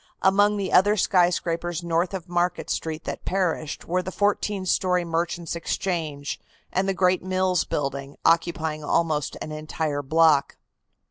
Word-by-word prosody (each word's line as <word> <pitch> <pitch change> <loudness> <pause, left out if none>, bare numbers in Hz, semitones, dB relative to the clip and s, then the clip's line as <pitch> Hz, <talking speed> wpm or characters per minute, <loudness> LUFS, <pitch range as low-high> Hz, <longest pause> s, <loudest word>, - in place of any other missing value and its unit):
Among 205 +2 +4
the 195 -2 -3
other 205 +3 +5
skyscrapers 175 -2 +1
north 170 +3 0
of 185 -1 -6
Market 175 0 -1
Street 160 0 -3
that - - -5
perished 175 -5 -1
were 180 +2 0
the 185 - -6
fourteen 205 -1 0
story 180 -1 +1
Merchants' 170 0 -2
Exchange, 165 -4 -3 0.3
and 190 +1 +1
the 195 - 0
great 185 0 +2
Mills 185 -1 +1
Building, 140 0 -3
occupying 160 -2 +1
almost 150 -1 0
an 155 - -7
entire 155 -1 -3
block. 155 0 +3
170 Hz, 140 wpm, -25 LUFS, 155-185 Hz, 0.3 s, other